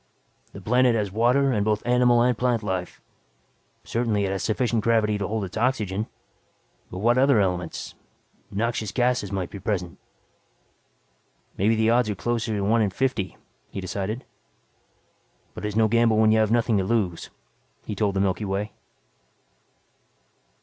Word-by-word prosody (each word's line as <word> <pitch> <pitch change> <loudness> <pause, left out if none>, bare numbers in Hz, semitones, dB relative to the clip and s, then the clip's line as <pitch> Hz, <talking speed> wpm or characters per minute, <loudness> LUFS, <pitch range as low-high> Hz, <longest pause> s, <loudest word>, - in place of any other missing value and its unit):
The 100 - -10
planet 125 +3 +3
has 105 -3 -1
water 125 +6 +3
and 105 -4 +1
both 105 0 0
animal 120 -1 +4
and 125 0 +2
plant 120 -1 0
life. 95 -3 -3 0.8
Certainly 115 -4 0
it 95 - -2
has 95 - -2
sufficient 115 0 0
gravity 110 -2 +2
to 100 - -2
hold 110 -1 -2
its 95 +2 -6
oxygen. 110 -4 0 0.8
But 90 - -8
what 120 +5 +2
other 135 -3 +4
elements 90 -3 -2 0.6
noxious 110 0 -2
gases 125 -5 0
might 95 -3 -3
be 100 - -7
present. 95 -3 -3 1.6
Maybe 110 +4 +2
the 110 +1 +2
odds 120 -2 +2
are 105 - -1
closer 115 +2 -2
to 100 - -1
one 110 +4 +2
in 105 - +2
fifty, 110 -2 -2 0.3
he - - -6
decided. 100 +5 -4 1.3
"But - - -7
it's 105 -1 -3
no 110 0 +4
gamble 115 0 +3
when 110 0 +5
you 110 - +4
have 110 -1 +2
nothing 115 -2 +2
to - - 0
lose," 95 -5 -1 0.6
he - - -4
told 100 -1 0
the 95 - +1
Milky 100 +2 0
Way. 100 +2 -2
110 Hz, 155 wpm, -24 LUFS, 100-120 Hz, 1.6 s, when